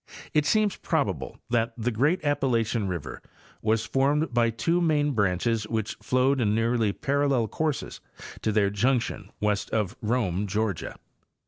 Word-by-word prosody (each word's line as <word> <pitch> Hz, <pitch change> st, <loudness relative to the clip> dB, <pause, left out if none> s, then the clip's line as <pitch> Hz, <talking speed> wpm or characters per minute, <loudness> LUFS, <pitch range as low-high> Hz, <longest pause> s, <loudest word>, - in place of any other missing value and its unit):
It 150 Hz, -1 st, +2 dB
seems 215 Hz, -2 st, +2 dB
probable 100 Hz, -, -2 dB
that 115 Hz, -1 st, +1 dB
the 120 Hz, +2 st, -1 dB
great 150 Hz, -, +1 dB
Appalachian 120 Hz, -7 st, +1 dB
river 85 Hz, -7 st, -5 dB, 0.4 s
was 110 Hz, +1 st, +1 dB
formed 140 Hz, +1 st, +1 dB
by 120 Hz, -1 st, +3 dB
two 140 Hz, +11 st, 0 dB
main 150 Hz, -3 st, +2 dB
branches 105 Hz, 0 st, 0 dB
which 110 Hz, -1 st, -2 dB
flowed 130 Hz, +1 st, +2 dB
in 105 Hz, -2 st, +2 dB
nearly 115 Hz, -1 st, +1 dB
parallel 140 Hz, -2 st, +1 dB
courses 155 Hz, +5 st, -3 dB, 0.4 s
to 110 Hz, -, 0 dB
their 100 Hz, -2 st, +2 dB
junction 115 Hz, -2 st, 0 dB
west 105 Hz, -1 st, 0 dB
of 105 Hz, -1 st, -1 dB
Rome, 105 Hz, -4 st, 0 dB
Georgia. 105 Hz, -2 st, -2 dB
115 Hz, 140 wpm, -26 LUFS, 105-140 Hz, 0.4 s, by